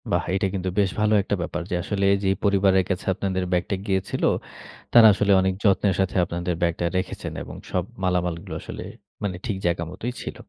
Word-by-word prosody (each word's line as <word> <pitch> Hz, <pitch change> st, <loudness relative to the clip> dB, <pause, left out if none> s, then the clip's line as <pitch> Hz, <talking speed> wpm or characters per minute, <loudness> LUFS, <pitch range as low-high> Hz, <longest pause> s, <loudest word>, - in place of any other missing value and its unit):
বাহ! -, -, +2 dB
এটা 95 Hz, 0 st, +1 dB
কিন্তু 95 Hz, -1 st, -2 dB
বেশ 100 Hz, -2 st, +3 dB
ভালো 105 Hz, 0 st, +3 dB
একটা 100 Hz, -, -1 dB
ব্যাপার। 85 Hz, +1 st, -3 dB
যে -, -, -1 dB
আসলে 100 Hz, +1 st, -2 dB
এইযে 100 Hz, -1 st, 0 dB
পরিবারের 95 Hz, -2 st, +3 dB
কাছে 95 Hz, -1 st, -2 dB
আপনাদের 95 Hz, -1 st, -1 dB
ব্যাগটা 90 Hz, +2 st, 0 dB
গিয়েছিল, 95 Hz, -2 st, -1 dB, 0.7 s
তারা 115 Hz, -2 st, +9 dB
আসলে 105 Hz, +1 st, +1 dB
অনেক 95 Hz, 0 st, +1 dB
যত্নের 100 Hz, -1 st, +3 dB
সাথে 95 Hz, -1 st, 0 dB
আপনাদের 85 Hz, +1 st, -2 dB
ব্যাগটা 85 Hz, 0 st, 0 dB
রেখেছেন 95 Hz, -, -4 dB
এবং -, -, -9 dB, 0.2 s
সব 90 Hz, -, +1 dB, 0.2 s
মালামালগুলো 90 Hz, -2 st, -1 dB
আসলে -, -, -7 dB, 0.4 s
মানে 95 Hz, -3 st, -2 dB
ঠিক 105 Hz, -5 st, -2 dB
জায়গা 85 Hz, -1 st, +1 dB
মতোই 115 Hz, +7 st, -5 dB
ছিল। -, -, -6 dB
95 Hz, 185 wpm, -24 LUFS, 90-100 Hz, 0.7 s, তারা